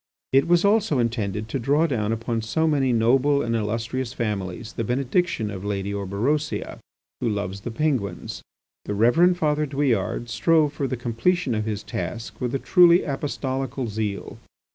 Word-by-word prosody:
It 135 +3 +4
was 175 +2 +4
also 205 -7 +3
intended 110 -3 -1
to 135 - -2
draw 145 +6 +2
down 110 -8 -1
upon 115 0 -2
so 160 +9 0
man 135 -6 +2
noble 135 +5 +3
and 115 0 -1
illustrious 115 +3 -2
families 105 -3 -3
the 115 - -3
benediction 130 - 0
of 95 -1 -7
L. 100 - -3
Orberosia, 100 +8 -2 0.4
who 115 - 0
loves 100 -2 -3
the 120 - -5
Penguins. 115 - -2 0.4
The 105 - -3
Reverend 165 - +4
Father 150 -2 +1
Douillard 130 -5 0
strove 150 +5 +2
for 140 -2 -2
the 130 - -3
completion 120 +6 0
of 110 -1 -1
his 105 -2 -3
task 90 +10 -5
with 125 +1 -1
a - - +3
truly 175 +4 +5
apostolical 135 -2 -3
zeal. 105 -2 -4
120 Hz, 160 wpm, -24 LUFS, 110-145 Hz, 0.4 s, truly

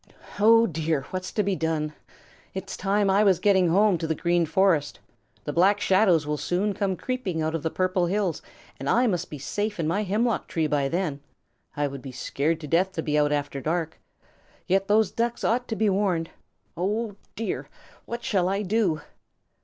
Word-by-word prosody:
Oh, 225 +2 +6
dear, 160 -5 -1
what's 185 0 -4
to 210 - +1
be 195 -1 0
done? 160 -2 -1 0.6
It 190 0 -5
is - - -4
time 200 +1 +1
I 195 +2 +4
was 195 -4 +4
getting 190 -1 +3
home 195 0 +3
to 160 - -2
the 160 - 0
Green 170 0 +1
Forest. 185 -5 +2 0.4
The 145 - -4
Black 195 +5 +4
Shadows 185 -6 +3
will 150 0 -1
soon 200 +4 0
come 195 -1 -1
creeping 195 -9 -3
out 160 0 -1
from 165 - -2
the 160 - -1
Purple 185 0 0
Hills, 190 -3 -1 0.4
and 135 +1 -3
I 245 +2 +4
must 180 -6 -1
be 150 - -7
safe 205 +8 -3
in 160 - 0
my 190 +6 +1
hemlock 215 +3 0
tree 160 -2 -1
by 145 -2 +1
then. 165 -4 -2 0.6
I 145 - +1
would 140 -1 -5
be 135 - -8
scared 145 +5 -1
to 150 - -6
death 180 +5 +2
to 160 - -3
be 150 - -1
out 145 0 +2
after 145 -1 -2
dark. 160 +2 -2 0.7
Yet 195 +1 +1
those 210 -1 +3
Ducks 235 0 -2
ought 245 +2 +1
to 225 - -3
be 220 0 +1
warned. 190 -4 0 0.4
Oh, 205 +4 -2 0.2
dear, 225 - -4 0.4
what 235 0 -5
shall 185 -3 +1
I 200 +2 -1
do?" 195 -5 +1
185 Hz, 195 wpm, -25 LUFS, 160-205 Hz, 0.7 s, Oh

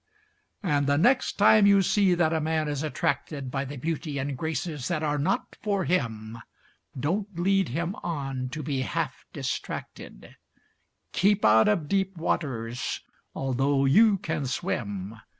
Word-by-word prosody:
And 145 -6 +1
the 145 0 +3
next 250 - +3
time 210 0 +6
you 200 -1 +5
see 190 -1 +3
that 170 -2 +2
a 160 - 0
man 155 0 0
is 145 -2 -2
attracted 140 -2 -2
By 135 0 -2
the 140 +2 -7
beauty 150 +1 -3
and 140 0 -2
graces 155 -1 -3
that 165 -3 -1
are 150 -1 0
not 140 - -1
for 200 -4 0
him, 115 -9 -2 0.6
Don't 195 +6 -2
lead 195 +1 +2
him 170 +8 -2
on 135 -5 -3
to 155 +3 -5
be 135 -2 -1
half 130 - -3
distracted; - - -6 0.8
Keep 200 +2 +3
out 110 +1 +6
of 175 -8 +1
deep 190 +1 0
waters 125 -7 -2 0.3
although 135 +1 +1
you 205 +9 +5
can 160 -6 -3
swim. 105 -4 -3
150 Hz, 150 wpm, -27 LUFS, 135-180 Hz, 0.8 s, time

